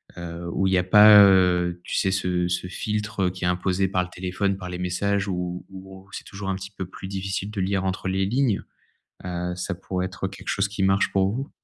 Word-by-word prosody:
heu 85 0 -7
où 95 - +1
il 95 - +1
y - - +4
a 90 - +2
pas, 105 +2 +8
heu, 90 -2 +3
tu - - -4
sais, 95 - +2
ce 90 -2 0
ce 90 +1 -2
filtre, 105 +1 -3
heu, 90 - +2
qui 95 0 -8
est - - +2
imposé 90 +2 +1
par 90 -1 +1
le 90 - -9
téléphone, 95 +2 -2
par 90 -2 -7
les 90 - -5
messages, 100 +3 -1
où 90 -1 -4
où 95 0 -12
c'est - - -6
toujours 95 0 -8
un 95 - 0
petit 95 +1 -8
peu 95 -2 -6
plus 95 +1 -9
difficile 95 +1 -3
de 105 - -5
lire 95 0 0
entre 95 0 -2
les 95 +1 0
lignes. 120 0 +1 0.6
Heu, 90 0 -3
ça 90 +1 -4
pourrait 90 0 -3
être 95 0 -4
quelque 95 +1 -11
chose 100 0 +1
qui 100 -1 -5
marche 95 +1 +2
pour 95 0 +2
vous? 135 +5 -4
95 Hz, 235 wpm, -24 LUFS, 90-100 Hz, 0.6 s, pas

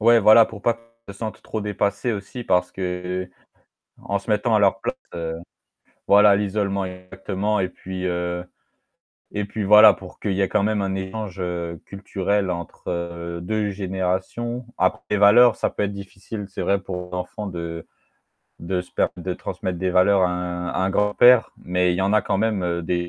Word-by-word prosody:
Ouais 115 +2 +6
voilà, 110 +1 +7
pour 105 -2 -10
pas 120 - +2
qu'ils 115 -2 -16
se - - -16
sentent 110 -2 -5
trop 110 - -4
dépassés 105 +2 -1
aussi 105 +4 -6
parce 90 -4 +1
que 90 0 -4 0.7
en 100 - -1
se 100 - -9
mettant 110 +2 +2
à - - +4
leur 100 +3 +3
place, - - -2 1.1
voilà, 100 0 +7
l'isolement 100 -1 -1
exactement 95 +3 -3
et 95 - 0
puis 95 0 -7
heu 90 0 -2 0.9
et 105 - -1
puis 105 +1 -4
voilà 105 +1 +8
pour 95 -1 -12
qu'il 105 - -2
y 95 - 0
ait 95 - +3
quand 100 - +1
même 105 0 +1
un 95 -1 -1
échange 95 0 -5 0.4
culturel 100 0 -2
entre 85 0 -5
2 105 +1 -1
générations. 95 +5 -3
Après 95 - +1
les 105 - +1
valeurs, 110 +4 +7
ça - - 0
peut - - -3
être 100 - -1
difficile, 100 +2 -8
c'est 95 - -6
vrai 100 +2 +1
pour 90 -1 -6
l'enfant 90 +4 -4
de 85 -2 -6 0.7
de 90 +2 -2
se 90 - -17 0.3
de - - -3
transmettre 90 -1 -4
des 95 +1 -1
valeurs 95 +2 +4
à - - +4
un 90 0 -3
à - - -2
un 95 +1 +1
grand-père, 105 +5 +5
mais 90 0 +1
il - - -1
y - - 0
en 95 +1 +1
a 105 - +4
quand - - 0
même 95 -6 0
des 85 +2 -1
95 Hz, 180 wpm, -23 LUFS, 90-105 Hz, 1.1 s, voilà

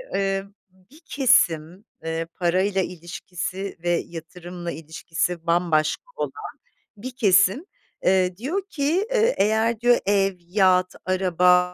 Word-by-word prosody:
eee, 195 0 0 0.3
bir 190 - -22
kesim, 190 - +2 0.2
eee, 165 0 -3
parayla 190 +2 +1
ilişkisi 180 +2 -6
ve 175 - 0 0.2
yatırımla 175 +1 -8
ilişkisi 165 +2 -4
bambaşka 170 - +1
olan - - -3 0.7
bir 255 +6 -7
kesim, 195 - +3 0.4
eee, 185 -1 +2
diyor 315 - -2
ki, 330 +8 0
eee, 475 +1 +2
"Eğer," 220 +2 +2
diyor, 240 +1 +4
"Ev, 195 -1 +2
yat, 185 0 +2
araba 180 -1 +3
185 Hz, 115 wpm, -23 LUFS, 175-210 Hz, 0.7 s, diyor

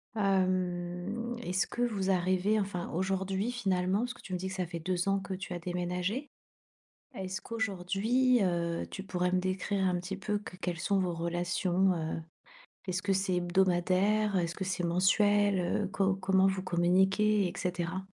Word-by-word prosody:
hem 185 +3 0
est-ce 185 -3 0
que 240 - -5
vous 200 -5 +1
arrivez 185 +3 +2
enfin 190 -3 -3
aujourd'hui 190 +4 -1
finalement 190 -4 0
parce 245 +1 -2
que - - -16
tu 185 - -8
me 180 - +1
dis 190 +1 -4
que - - -6
ça 185 -3 -2
fait 170 -1 -5
2 180 +3 -1
ans 195 - +2
que 195 0 -6
tu 185 -1 -5
as 175 - -4
déménagé. 180 - -2 0.9
Est-ce 190 -3 -4
qu'aujourd'hui, 225 +4 +1
heu, 170 -2 0
tu 195 - -6
pourrais 180 -1 -1
me 185 - +3
décrire 190 +1 -1
un 180 -1 +1
petit 185 +2 -5
peu 205 +1 -1
qu 195 -3 -10
quelles 175 -3 -3
sont 200 +3 +1
vos 180 -2 0
relations, 175 +2 +1
heu, 160 -1 -3 0.7
est-ce 185 -1 -1
ce - - -5
que 200 -1 +1
c'est 190 -1 +1
hebdomadaire? 185 +3 +2
Est 175 -2 +2
ce 170 - -6
que - - -5
c'est 185 -1 -2
mensuel? 205 +3 +3
Heu, 185 +2 0
co 195 -1 +1
comment 190 0 +3
vous 190 -1 0
communiquez, 190 +3 +3
et - - -5
cetera? 180 +1 -2
185 Hz, 180 wpm, -31 LUFS, 180-200 Hz, 0.9 s, me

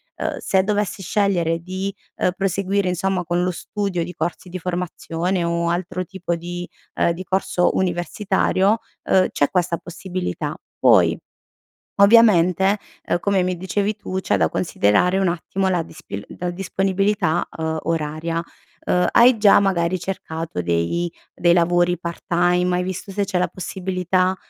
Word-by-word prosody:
uhm, - - -3
se 190 -1 +2
dovessi 205 -1 -1
scegliere 175 -4 +1
di, 185 +3 -4 0.2
ehm, - - +1
proseguire 195 +1 0
insomma 185 +1 0
con 175 +1 0
lo 180 - +1
studio 190 -1 -3
di 180 +2 -7
corsi 175 +1 -4
di 180 - -5
formazione, 180 0 -2
o 170 0 0
altro 180 +1 -2
tipo 185 -1 -3
di, 175 +1 -6 0.3
ehm, - - +2
di 170 +2 -5
corso 190 -1 +1
universitario, 190 +3 +1 0.2
ehm, 185 -1 +3
c'è 145 - 0
questa 175 -2 +1
possibilità. 180 +1 -5 0.2
Poi, - - +5 0.8
ovviamente, 200 -3 +5 0.2
ehm, - - 0
come 195 +1 +1
mi 180 0 -1
dicevi 200 +3 -1
tu, 190 -2 -4
c'è 105 - +1
da 80 -4 +2
considerare 105 - +2
un 195 - +2
attimo 180 +2 -1
la 180 -2 +1
dispi 100 -10 -8
la 180 0 -2
disponibilità, 195 -1 0
uhm, 160 0 -2
oraria. 165 +1 -2 0.5
Uhm, 180 0 +3
hai 240 +1 +6
già 210 -2 +6
magari 185 -2 +1
cercato 160 - -4
dei 85 - 0 0.2
dei 175 0 +3
lavori 175 +1 +2
part 170 0 -6
time, 180 +1 +2
hai 180 - 0
visto 190 +2 -5
se 200 +1 -1
c'è 185 -1 -1
la 180 - +1
possibilità, 185 0 -1
180 Hz, 150 wpm, -21 LUFS, 170-190 Hz, 0.8 s, hai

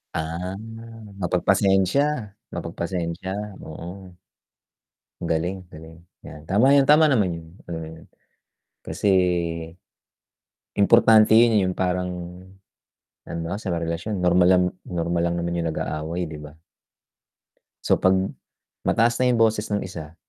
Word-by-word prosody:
Ah, 85 +4 -3 0.6
mapagpasensya, 95 - +1 0.2
mapagpasensya, 85 +2 -4 0.3
oo. 90 +3 -10 1.1
Ang 85 - -3
galing, 85 +4 0
galing 80 +1 -12 0.3
yan 75 - -10
tama 115 +8 +4
yan, 140 -1 +4
tama 150 +2 +7
naman 110 -10 +2
yun, 80 -1 -10 0.2
mm, 80 -1 -8 0.8
kasi, - - -2 1.7
importante 110 +1 +6
yun, 115 0 +6
yung 95 - -2
parang, 90 0 -1 1.2
halimbawa 85 +2 -4
sa 95 - -4
mga 85 0 -2
relasyon 85 +6 -3
normal 90 0 +4
lang 90 -1 +5 0.2
normal 85 -1 -2
lang 85 0 0
naman 85 0 -2
yung 85 - -1
nag-aaway 80 +3 -3
di 80 - -8
ba? 75 +1 -12 1.3
So - - +3
'pag 95 0 +4 0.7
mataas 120 +1 +2
na 125 0 +3
yung 120 - +2
boses 110 -1 +2
ng 105 -1 -1
isa, 80 -3 -9
90 Hz, 120 wpm, -23 LUFS, 85-105 Hz, 1.7 s, tama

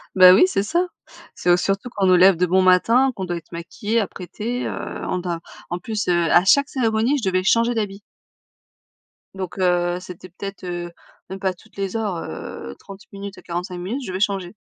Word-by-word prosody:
Ben 185 -1 +9
oui, - - +6
c'est 370 - 0
ça. 340 - +1 0.5
C'est 180 - -2
au 175 - +6
surtout 195 +6 -1
qu'on 195 -2 +1
nous 185 - +6
lève 185 +1 +7
de 180 +2 +2
bon 185 +2 +3
matin, 230 +9 +4
qu'on 190 - -4
doit 175 -1 -3
être 170 - -13
maquillée, 205 +7 -2
apprêtée, 215 +5 -4
heu, - - -3 0.4
on 180 - 0
doit, 175 -2 -3 0.3
en 175 - -2
plus, 215 +2 -3
heu, 180 - +3 0.2
à 175 - +5
chaque 280 +8 +4
cérémonie, 235 +2 +1
je - - -1
devais 185 0 +1
changer 230 +4 +3
d'habits. 205 -3 -3 1.3
Donc 190 -1 -6
heu, 175 -1 +1
c'était 180 0 -10
peut-être 195 +2 -8
heu, 175 -1 -5 0.4
même 190 - -6
pas 190 -1 0
toutes 220 +5 -22
les 195 +2 -2
heures, 205 -6 -2
heu, 70 - -7
30 195 0 -12
minutes 200 0 -8
et - - -14
45 180 +1 -5
minutes, 215 +10 -4
je - - -7
devais 185 - -3
changer. 195 -3 -1
190 Hz, 205 wpm, -22 LUFS, 180-215 Hz, 1.3 s, Ben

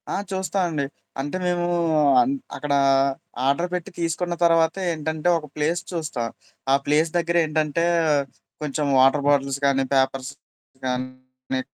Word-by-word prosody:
ఆ! - - -1 0.2
చూస్తా 190 +1 -2
అండి. 150 -4 -2 0.4
అంటే 145 +6 -3
మేము 175 -1 0 0.6
అన్ 255 +3 +1 0.2
అక్కడ 145 -1 -2 0.7
ఆర్డర్ 140 +6 +1
పెట్టి 180 0 -3
తీసుకున్న 170 +1 -1
తర్వాతేంటంటే 165 -1 +1
ఒక 155 -2 -8
ప్లేస్ 160 +3 0
చూస్తా. 160 -8 -3 0.5
ఆ - - +6
ప్లేస్ 155 +3 +2
దగ్గర 170 0 0
ఏంటంటే, 155 +1 0 0.8
కొంచెం 150 0 -2
వాటర్ 135 +2 +4
బాటిల్స్ 140 -1 +2
గానీ, 135 -1 +3
పేపర్స్ 135 0 +1 0.5
కానీ, 130 0 -4
150 Hz, 125 wpm, -23 LUFS, 135-170 Hz, 0.8 s, ఆ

